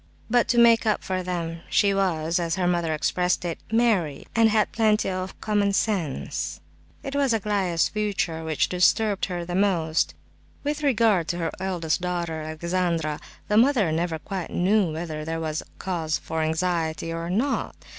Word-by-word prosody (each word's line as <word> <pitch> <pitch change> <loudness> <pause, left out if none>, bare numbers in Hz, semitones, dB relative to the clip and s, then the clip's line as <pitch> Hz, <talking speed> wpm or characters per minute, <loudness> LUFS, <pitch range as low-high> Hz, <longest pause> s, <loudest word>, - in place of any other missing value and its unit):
But 245 -1 +4
to 240 - +1
make 230 -1 +6
up 215 - +1
for 185 -1 -2
them 170 -2 -4
she 200 -1 +3
was, 170 -4 0
as 165 -1 -1
her 185 -1 0
mother 170 -2 +1
expressed 180 +4 0
it, 170 -2 -3
"merry," 210 -11 +1
and 225 -1 +5
had 215 -1 +2
plenty 215 -3 +2
of 185 0 -5
"common 205 -2 +1
sense." 190 -9 -1 0.4
It 275 0 -5
was 275 -4 +2
Aglaya's 195 -6 +1
future 200 -6 -2
which 160 -2 0
disturbed 195 +3 +2
her 175 -2 -4
most. 175 -5 +1 0.5
With 295 +1 -2
regard 225 - +3
to 175 - -2
her 165 -2 -2
eldest 180 -4 -1
daughter, 170 -3 -2
Alexandra, 165 -1 -1 0.3
the 210 - +2
mother 230 - +4
never 165 0 -1
quite 185 +2 -5
knew 190 -1 +2
whether 155 -1 -4
there 165 +1 -3
was 155 -1 -2 0.2
cause 165 -5 -2
for 160 0 -4
anxiety 160 0 -1
or 165 +1 -4
not. 240 +10 -1
180 Hz, 160 wpm, -25 LUFS, 165-210 Hz, 0.5 s, make